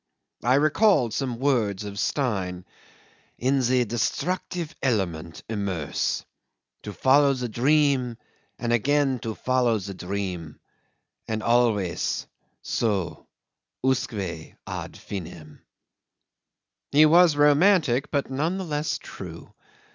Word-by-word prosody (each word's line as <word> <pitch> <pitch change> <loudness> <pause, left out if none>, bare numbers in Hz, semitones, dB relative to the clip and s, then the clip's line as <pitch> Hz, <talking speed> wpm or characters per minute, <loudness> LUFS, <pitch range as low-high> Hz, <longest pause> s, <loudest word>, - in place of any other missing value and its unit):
I 125 +3 +4
recalled 150 - +3
some 125 -3 -2
words 115 -7 +1
of 100 -1 -6
Stein's.... 95 -11 -1 0.7
"In 135 +3 +1
the 125 0 +2
destructive 165 - -2
element 90 - -2
immerse!... 100 -8 -2 0.6
To 105 - -7
follow 140 +5 +4
the 125 -1 -3
dream, 130 0 +2 0.4
and 120 -1 -1
again 135 +2 +2
to 110 -1 -5
follow 125 -3 +1
the 100 -1 -6
dream 90 -4 -5 0.7
and 110 0 -3
so - - -3
always 110 -7 +1 1.6
usque 130 -2 +1 0.5
ad - - -6
finem.. 80 -5 -8 0.7
." - - -61
He 150 +2 +7
was 165 0 +6
romantic, 145 -2 +4
but 140 -2 -1
none 160 +8 -1
the 190 - -4
less 150 -1 -1
true. - - -10
125 Hz, 110 wpm, -25 LUFS, 105-145 Hz, 1.6 s, He